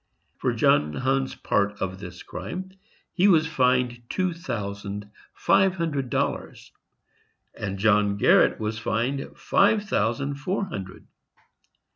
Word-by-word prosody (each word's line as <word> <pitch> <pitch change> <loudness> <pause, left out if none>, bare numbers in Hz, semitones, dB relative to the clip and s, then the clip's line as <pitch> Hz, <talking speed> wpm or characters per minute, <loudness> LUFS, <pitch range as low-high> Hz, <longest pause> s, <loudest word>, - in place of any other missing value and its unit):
For - - +1
John 75 +1 +3
Hunn's 135 0 0
part 100 0 0
of 95 0 -3
this 90 -2 -9
crime, 180 - -6 0.4
he 190 +2 +4
was 160 -5 +5
fined 125 -5 +1
two 185 -2 0
thousand 105 - -5 0.2
five 190 -1 +3
hundred 150 -7 -2
dollars, - - -3 0.8
and 100 -1 -4
John 105 0 +3
Garret - - +4
was 110 0 -3
fined 120 +5 -2
five 205 +1 +3
thousand 140 - -1
four 190 +7 -1
hundred. 95 - -8
120 Hz, 120 wpm, -25 LUFS, 100-160 Hz, 0.8 s, was